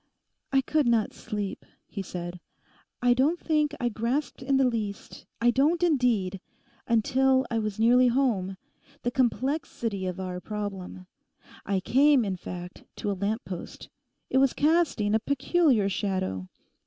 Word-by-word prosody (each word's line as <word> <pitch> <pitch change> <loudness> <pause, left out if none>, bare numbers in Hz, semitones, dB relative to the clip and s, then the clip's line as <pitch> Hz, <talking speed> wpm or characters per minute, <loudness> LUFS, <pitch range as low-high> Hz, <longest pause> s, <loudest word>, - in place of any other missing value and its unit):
'I 270 -1 +4
could 295 0 +1
not 230 -3 +2
sleep,' 210 -3 -5 0.2
he 200 - -6
said; 175 -1 -6 0.6
'I 245 0 +5
don't 290 +8 +2
think 300 -2 +1
I 245 - +1
grasped 240 +7 -2
in 270 +1 +1
the 270 - +4
least, 215 -4 -4
I 240 +1 +4
don't 305 +7 +2
indeed, 235 - +1 0.5
until 260 +3 +3
I 230 - +1
was 215 -2 -3
nearly 245 +3 +5
home, 230 -7 +1 0.5
the 245 - 0
complexity 240 -5 -1
of 185 0 -4
our 180 -1 -4
problem. 195 -3 -6 0.6
I 195 -1 0
came, 270 +3 +4
in 195 -2 -2
fact, 180 0 -8
to 205 - -2
a - - 0
lamppost. 200 -1 -4 0.4
It 265 - +4
was 270 -1 +3
casting 295 -10 +2
a 220 - +4
peculiar 280 - +2
shadow. 185 - -2
230 Hz, 140 wpm, -27 LUFS, 195-270 Hz, 0.6 s, I